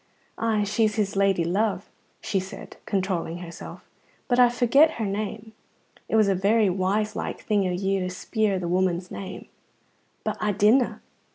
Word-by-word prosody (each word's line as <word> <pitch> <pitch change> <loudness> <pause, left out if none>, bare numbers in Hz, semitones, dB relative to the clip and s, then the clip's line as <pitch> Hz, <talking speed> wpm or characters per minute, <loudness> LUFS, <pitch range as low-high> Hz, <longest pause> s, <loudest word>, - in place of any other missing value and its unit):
"Ay, 220 -2 +1
she's 210 +1 +1
his 205 -3 -1
lady 195 -3 +2
love," 195 +3 -1 0.3
she 195 - 0
said, 190 +1 -9
controlling 185 -4 -1
herself, 170 -1 -10 0.4
"but 245 -1 +2
I 245 -1 +7
forget 275 +6 +4
her 225 - -3
name. 215 +2 -4 0.6
It - - 0
was 215 -2 +5
a 195 - +3
very 200 +2 +3
wise 200 +3 0
like - - -4
thing 205 -3 +1
o' - - -1
you 195 +2 0
to 185 0 -2
speir 205 +2 -1
the 180 -2 -3
woman's 180 0 0
name." 190 -1 -7 0.8
"But - - -2
I 210 -1 +1
didna." 220 +6 +3
200 Hz, 165 wpm, -25 LUFS, 185-220 Hz, 0.8 s, I